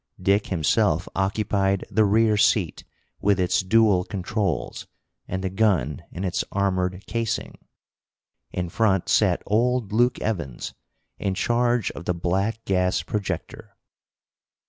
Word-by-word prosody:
Dick 100 Hz, +3 st, +2 dB
himself 90 Hz, +1 st, +1 dB
occupied 95 Hz, 0 st, 0 dB
the 110 Hz, +1 st, +3 dB
rear 110 Hz, +1 st, +3 dB
seat, 100 Hz, -, +2 dB, 0.4 s
with 100 Hz, -1 st, +2 dB
its 90 Hz, +1 st, +2 dB
dual 100 Hz, -1 st, +3 dB
controls, 95 Hz, -, -3 dB, 0.4 s
and 95 Hz, +1 st, -3 dB
the 95 Hz, -, -1 dB
gun 95 Hz, -, +1 dB
in 90 Hz, -, -5 dB
its 90 Hz, -2 st, -1 dB
armored 95 Hz, -1 st, -1 dB
casing. 115 Hz, -1 st, -3 dB, 0.9 s
In 90 Hz, -1 st, -3 dB
front 95 Hz, -1 st, +1 dB
sat -, -, +3 dB
old 120 Hz, 0 st, +1 dB
Luke 120 Hz, +3 st, +2 dB
Evans, 85 Hz, -, -3 dB, 0.5 s
in 95 Hz, -1 st, -1 dB
charge 120 Hz, +1 st, +1 dB
of 85 Hz, -, -9 dB
the 90 Hz, -, 0 dB
black 95 Hz, +6 st, -1 dB
gas 90 Hz, -1 st, +1 dB
projector. 100 Hz, -5 st, -5 dB
100 Hz, 125 wpm, -24 LUFS, 90-110 Hz, 0.9 s, the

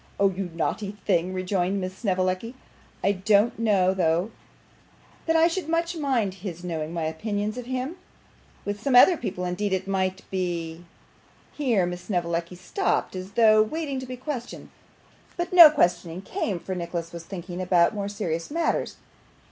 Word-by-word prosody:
'Oh 195 Hz, -1 st, +4 dB
you 185 Hz, 0 st, -4 dB
naughty 200 Hz, +4 st, -2 dB
thing!' 175 Hz, +2 st, +2 dB
rejoined 185 Hz, +1 st, -1 dB
Miss 185 Hz, 0 st, -4 dB
Snevellicci. 185 Hz, +3 st, -1 dB, 0.5 s
'I 200 Hz, -, +4 dB
don't 205 Hz, +3 st, +2 dB
know 195 Hz, -5 st, +3 dB
though, 175 Hz, +2 st, +1 dB, 1.0 s
that 325 Hz, -, +2 dB
I 325 Hz, +1 st, +6 dB
should 345 Hz, -1 st, -3 dB
much 335 Hz, +1 st, 0 dB
mind 260 Hz, -, 0 dB
HIS 175 Hz, -3 st, -6 dB
knowing 160 Hz, -3 st, -3 dB
my 170 Hz, -1 st, -3 dB
opinion 205 Hz, +6 st, -2 dB
of 245 Hz, +2 st, -8 dB
him; 260 Hz, +6 st, -3 dB, 0.7 s
with 205 Hz, +1 st, -3 dB
some 265 Hz, +1 st, +1 dB
other 345 Hz, +9 st, +8 dB
people, 190 Hz, -, -4 dB
indeed, 190 Hz, +3 st, -1 dB
it 190 Hz, 0 st, -2 dB
might 190 Hz, -1 st, -1 dB
be 175 Hz, -2 st, -3 dB, 0.3 s
' -, -, -32 dB
Here 240 Hz, -11 st, +1 dB
Miss 175 Hz, 0 st, -5 dB
Snevellicci 170 Hz, -2 st, -2 dB
stopped, 190 Hz, -, -1 dB
as 185 Hz, +2 st, -7 dB
though 215 Hz, -1 st, +6 dB
waiting 280 Hz, +4 st, -2 dB
to 260 Hz, -, -7 dB
be 255 Hz, 0 st, -6 dB
questioned, 255 Hz, -2 st, -6 dB, 0.7 s
but 350 Hz, +1 st, -3 dB
no 340 Hz, -4 st, +11 dB
questioning 175 Hz, -, 0 dB
came, 210 Hz, -, -2 dB
for 180 Hz, +3 st, -5 dB
Nicholas 170 Hz, -1 st, -4 dB
was 170 Hz, -1 st, -7 dB
thinking 180 Hz, 0 st, -6 dB
about 180 Hz, -2 st, +3 dB
more 200 Hz, -1 st, -3 dB
serious 170 Hz, -6 st, -3 dB
matters. 330 Hz, +2 st, -1 dB
195 Hz, 165 wpm, -25 LUFS, 180-240 Hz, 1.0 s, no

